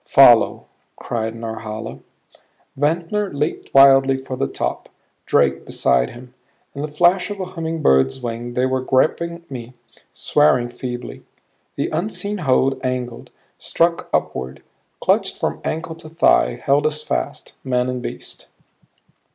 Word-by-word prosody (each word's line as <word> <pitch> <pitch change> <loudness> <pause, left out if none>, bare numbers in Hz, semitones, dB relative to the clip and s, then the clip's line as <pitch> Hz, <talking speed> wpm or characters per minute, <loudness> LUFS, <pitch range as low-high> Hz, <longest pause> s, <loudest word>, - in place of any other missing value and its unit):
"Follow," - - +6 0.3
cried 110 -1 -4
Norhala. 110 -1 -6 0.8
Ventnor 170 +8 0
leaped 150 +3 -3
wildly 135 -1 +6
for 130 0 -6
the 70 - -1
top, - - -4 0.4
Drake - - +2
beside 60 0 +1
him; 125 0 -13 0.4
in 140 - -6
the 150 - -2
flash 175 +5 +2
of 205 -1 -6
a 185 - -2
humming 165 -2 -4
bird's 65 - +3
wing 120 0 -5
they 125 - +2
were 130 0 0
gripping 170 +6 0
me, 125 -2 -8 0.4
swearing 130 -5 +2
feebly. 120 0 -7 0.5
The - - -1
unseen 205 +4 -2
hold 135 -3 +1
angled; 125 -2 -4 0.3
struck 170 0 0
upward; 65 +1 -2 0.4
clutched - - +1
from - - -2
ankle 160 +1 -3
to 160 -1 -11
thigh; 65 - +3
held 145 +2 +2
us 155 0 -2
fast - - -4
men 125 -1 0
and 125 -1 -3
beast. - - -8
130 Hz, 135 wpm, -20 LUFS, 120-160 Hz, 0.8 s, Follow